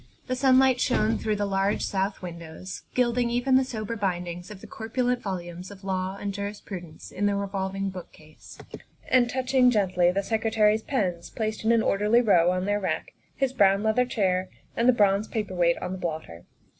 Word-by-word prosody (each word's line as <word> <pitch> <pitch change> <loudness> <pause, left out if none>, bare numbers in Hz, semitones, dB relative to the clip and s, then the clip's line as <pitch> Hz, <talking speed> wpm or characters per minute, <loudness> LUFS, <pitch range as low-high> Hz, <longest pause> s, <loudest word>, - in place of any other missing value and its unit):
The 255 - -2
sun 260 0 +4
light 260 -1 +4
shone 225 -3 +1
through 215 -1 -1
the 205 0 -1
large 195 +1 0
south 195 0 -2
windows, 170 +1 -8
gilding 245 -1 +2
even 245 +2 0
the 265 - +5
sober 230 -3 -4
bindings 180 -3 -3
of 210 -3 -9
the - - -12
corpulent 245 +2 -2
volumes 180 -2 -6
of 200 -1 -13
law 190 0 -2
and 200 -1 -3
jurisprudence 200 -5 -7
in 205 +2 0
the 200 - +1
revolving 195 -1 -2
bookcase 155 -4 -12 0.5
and 245 -2 +4
touch 260 +1 -3
ing 255 -2 +6
gently 185 -6 +2
the 200 +2 -1
Secretary's 220 0 +2
pens, 185 -10 -2
placed 220 -1 -3
in 220 - +3
an 230 -1 +3
orderly 210 +4 +3
row 180 -7 +4
on 185 +1 0
their 205 +1 +1
rack, 190 - -3 0.2
his 270 -1 0
brown 195 -4 +4
leather 220 +3 +2
chair, 185 -5 0 0.3
and 235 +2 +3
the - - +6
bronze 205 -1 +2
paper 210 -4 -3
weight 170 -1 +2
on 180 - -5
the 190 - -5
blotter. 155 - -5
200 Hz, 190 wpm, -26 LUFS, 185-230 Hz, 0.5 s, ing